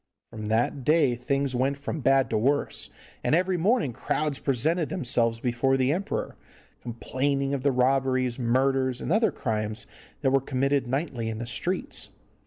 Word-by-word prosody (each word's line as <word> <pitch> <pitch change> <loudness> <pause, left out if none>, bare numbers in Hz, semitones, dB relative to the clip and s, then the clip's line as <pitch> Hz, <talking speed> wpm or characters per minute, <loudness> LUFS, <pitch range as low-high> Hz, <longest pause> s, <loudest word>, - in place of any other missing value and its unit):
From 110 -2 -6
that 115 +5 0
day 150 -2 +4
things 135 +2 -1
went 135 +3 0
from 150 +3 -4
bad 135 +1 +3
to 110 - +2
worse, 140 +6 0 0.3
and - - +3
every 185 +2 +1
morning 185 - +1
crowds 145 +3 -1
presented 150 +5 0
themselves 120 -9 0
before 125 +2 +1
the 130 +1 +2
emperor, 190 +4 -3 0.5
complaining 135 +4 -1
of 140 - -1
the 140 +1 +2
robberies, 130 -1 +1
murders, 130 +1 +1
and - - -4
other 220 0 +3
crimes 110 -3 -3 0.4
that 135 -3 +2
were 135 0 +3
committed 135 0 0
nightly 130 -4 -2
in 110 - -4
the 115 - -4
streets. 170 +11 -2
135 Hz, 160 wpm, -26 LUFS, 120-145 Hz, 0.5 s, day